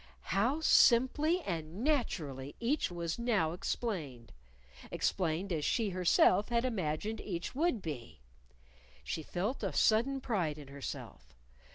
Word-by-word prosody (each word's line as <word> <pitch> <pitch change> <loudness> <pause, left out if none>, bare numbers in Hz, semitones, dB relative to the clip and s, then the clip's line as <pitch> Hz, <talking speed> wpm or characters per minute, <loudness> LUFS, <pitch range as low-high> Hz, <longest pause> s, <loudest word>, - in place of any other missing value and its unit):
How 240 +11 +2
simply 295 +6 +4
and 170 +3 -4
naturally 155 - -1
each 255 +3 0
was 170 +1 -4
now 215 -9 +1
explained! 160 - -4 0.6
explained 180 +1 -1
as 155 -2 -1
she 220 - +1
herself 185 +3 +4
had 235 +1 +1
imagined 205 -1 -2
each 170 -4 -4
would 280 - 0
be. 120 - -6 0.8
She 65 - -3
felt 190 - -3
a - - -1
sudden 240 +5 +3
pride 180 - -1
in 145 -2 -11
herself. 140 - -8
190 Hz, 125 wpm, -33 LUFS, 155-240 Hz, 0.8 s, simply